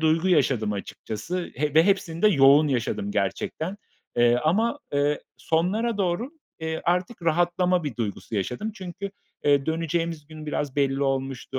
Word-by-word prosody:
duygu 160 +3 +2
yaşadım 130 - +2
açıkçası 110 - -5
he 150 +2 -1
ve 160 +1 +7
hepsini 175 -4 0
de 215 - +7
yoğun 145 -2 +6
yaşadım 115 -6 -1
gerçekten, 155 - -2 0.4
eee, 120 0 +5
ama, 225 - +2
eee, 145 +1 +1 0.2
sonlara 200 +8 0
doğru, 195 +7 0 0.3
eee, 160 0 -3
artık 180 +4 0
rahatlama 175 +1 +2
bir 140 -6 -4
duygusu 110 0 -4
yaşadım. 125 - -2
Çünkü, 195 0 -6 0.3
eee, 140 -1 +3
döneceğimiz 165 -1 -1
gün 155 0 -10
biraz 145 -2 -3
belli 140 -1 +1
olmuştu. 135 -1 -2
160 Hz, 145 wpm, -25 LUFS, 135-180 Hz, 0.4 s, ve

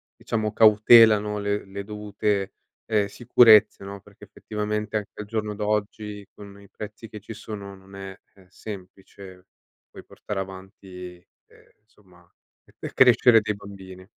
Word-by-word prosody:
diciamo, 110 -2 -3
cautela, 110 0 +7
no, 105 0 -4
le 100 0 -2
le 100 +1 -7
dovute, 105 -1 -3 0.3
ehm, 105 -3 +1
sicurezze, 110 -2 +5
no, 100 0 -8
perché, 105 +1 -19
effettivamente, 105 +1 -5
anche 105 - -6
al 105 - -5
giorno 105 -1 -4
d'oggi, 105 -1 -3
con 100 -1 -13
i 100 - -18
prezzi 105 +1 -10
che 105 - -9
ci 110 +3 -10
sono, 100 -2 -9
non 95 +1 -17
è, 95 -1 -8 0.2
ehm, 95 -2 -21
semplice 95 -1 -12 0.5
poi - - -12
portare 100 - -7
avanti 95 -1 -9 0.4
ehm, - - -22
insomma, 90 -5 -25 0.5
per - - -7
crescere 120 -2 +6
dei 105 0 -2
bambini. 95 -2 -12
105 Hz, 145 wpm, -24 LUFS, 95-105 Hz, 0.5 s, cautela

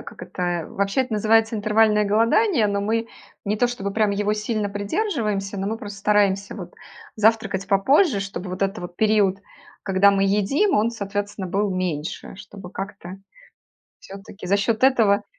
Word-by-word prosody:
э, - - -9
как - - -12
это, 175 -3 -3
вообще 200 +5 -1
это 255 -4 -2
называется 225 +1 +2
интервальное 210 0 +3
голодание, 230 - +2
но 200 0 -1
мы 225 +2 -1 0.4
не 210 +1 0
то 245 - +2
чтобы 200 -5 -4
прям 215 -2 +2
его 205 +1 0
сильно 210 -1 -2
придерживаемся, 205 - -2
но 195 - -3
мы 225 +2 -3
просто 205 -2 -8
стараемся 200 -1 +1
вот 180 -4 -9 0.4
завтракать 215 -3 +1
попозже, 235 - +3
чтобы 195 -1 -6
вот 185 +1 -6
этот 195 +2 -1
вот 175 0 -8
период, 210 -3 +2 0.4
когда 195 +1 +4
мы 195 0 +1
едим, 210 - +2
он, 220 +3 +2
соответственно, 205 -2 -4
был 200 +2 -1
меньше, 180 -4 -4
чтобы 190 -2 -11
как-то 195 -2 -7 0.9
всё-таки 195 -1 -11
за 200 +2 +2
счет 220 +4 +1
этого 215 -6 +3
205 Hz, 165 wpm, -22 LUFS, 195-220 Hz, 0.9 s, когда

